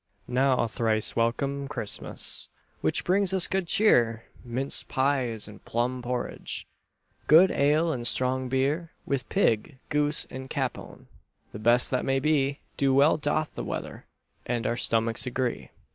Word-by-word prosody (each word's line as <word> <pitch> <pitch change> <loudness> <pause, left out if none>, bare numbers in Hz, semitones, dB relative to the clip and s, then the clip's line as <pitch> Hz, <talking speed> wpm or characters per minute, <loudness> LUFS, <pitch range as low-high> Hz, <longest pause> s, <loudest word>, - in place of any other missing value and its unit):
Now 130 0 +2
thrice 110 -1 0
welcome, 140 +4 -1
Christmas, 115 -8 -2 0.3
Which - - 0
brings 190 +1 +1
us 185 - +7
good 190 -2 -1
cheer, 115 - +3 0.2
Minced 130 +3 -1
pies 130 -5 0
and 105 -1 -13
plum 125 +2 -2
porridge, 125 0 -4 0.6
Good 170 +5 +7
ale 150 +4 +2
and 120 -5 -2
strong 130 +1 0
beer; 140 +6 0 0.2
With 135 -3 -2
pig, 115 +6 +1
goose, 150 0 +1
and 130 0 -7
capon, 130 -3 -4 0.5
The 105 - -8
best 120 +3 +3
that 130 - 0
may 135 0 +1
be, 140 -1 +1 0.2
So 135 -1 +3
well 140 +4 +5
doth 150 +1 -1
the - - -5
weather - - -6 0.4
And 120 -1 -2
our 120 - 0
stomachs 115 0 0
agree. 125 -1 -2
130 Hz, 145 wpm, -27 LUFS, 120-145 Hz, 0.6 s, us